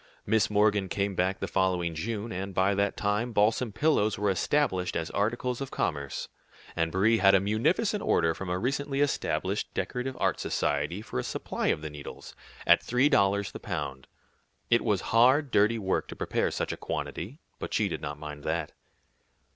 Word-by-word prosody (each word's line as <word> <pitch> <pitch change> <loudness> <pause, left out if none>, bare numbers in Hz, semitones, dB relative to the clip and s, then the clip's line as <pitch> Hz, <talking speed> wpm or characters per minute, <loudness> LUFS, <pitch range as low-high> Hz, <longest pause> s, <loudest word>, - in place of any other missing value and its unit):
Miss 110 0 +2
Morgan 105 -2 +2
came 100 +1 -1
back 95 +1 0
the - - -3
following 90 -3 0
June, 110 +6 -4
and 95 +1 -5
by 95 +2 +3
that 100 0 0
time 105 +4 0
balsam 110 +3 +2
pillows 110 -3 +2
were 100 0 +1
established 95 - 0
as 80 -1 -2
articles 120 +4 -1
of 135 - -4
commerce, 70 -3 -2 0.5
and 80 0 0
Brie 110 +5 +3
had 95 0 +6
a - - +6
munificent 140 - +1
offer 80 -1 +2
from 95 +2 -6
a 90 - 0
recently 135 +6 -1
established 145 -1 -1
Decorative 125 +1 -3
Art - - +1
Society 95 +5 -1
for 65 - -4
a - - -2
supply - - -3
of 75 - +1
the 80 - -5
needles, 75 -1 -9 0.3
at - - +6
three 125 +4 +2
dollars 100 -6 +2
the - - -8
pound. 65 -1 -5 0.6
It 120 - +4
was 105 -4 +1
hard, 130 +5 +5
dirty 105 +3 +3
work 95 -3 -1
to - - -8
prepare - - 0
such - - -2
a - - -5
quantity, 115 - -5 0.2
but - - -5
she - - +2
did - - -4
not 75 0 -5
mind 75 -1 -8
that. 80 -1 -2
100 Hz, 180 wpm, -28 LUFS, 90-115 Hz, 0.6 s, had